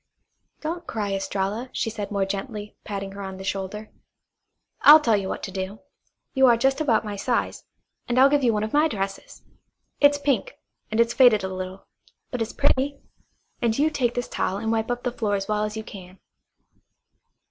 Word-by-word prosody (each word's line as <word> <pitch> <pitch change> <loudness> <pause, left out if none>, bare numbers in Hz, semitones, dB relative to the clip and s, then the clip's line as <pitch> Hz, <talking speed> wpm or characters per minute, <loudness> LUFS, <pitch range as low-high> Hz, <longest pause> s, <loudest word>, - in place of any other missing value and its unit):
"Don't 335 +3 -4
cry, 205 -3 -2
Estralla," 195 +5 -2
she 225 - -2
said 210 -2 -5
more 200 -2 0
gently, 205 +2 -5
patting 195 -1 -5
her 200 +1 -8
on 190 -1 -6
the 190 - -8
shoulder. 195 +2 -4 0.9
"I'll 300 +2 +10
tell 230 -8 +2
you 195 -2 -2
what - - -5
to 195 - -4
do. 190 +2 -5 0.5
You 265 -1 +5
are 235 -1 +5
just 270 +5 +1
about 230 -7 +2
my 205 -1 -4
size, 235 +4 -2 0.4
and 240 - -1
I'll 265 +1 +8
give 285 0 +2
you 240 - +4
one 210 -1 0
of 215 - -4
my 300 +2 +4
dresses. 195 -7 -5 0.6
It's 290 0 +5
pink, 285 - -1 0.3
and 220 - -2
it's 235 0 +3
faded 240 -6 +5
a 190 0 -3
little, 185 +1 -6 0.5
but 250 - -3
it's 225 - -2
pretty. 280 0 +1 0.6
And 230 -2 +1
you 305 +2 +2
take 245 -5 0
this 245 - -2
towel 190 - -2
and 220 +2 -2
wipe 225 0 0
up 245 0 -2
the 245 - -1
floor 215 -4 -1
as 195 0 -3
well 210 0 0
as 210 +1 -5
you 220 - -4
can. 185 -3 -11
220 Hz, 195 wpm, -24 LUFS, 195-255 Hz, 0.9 s, I'll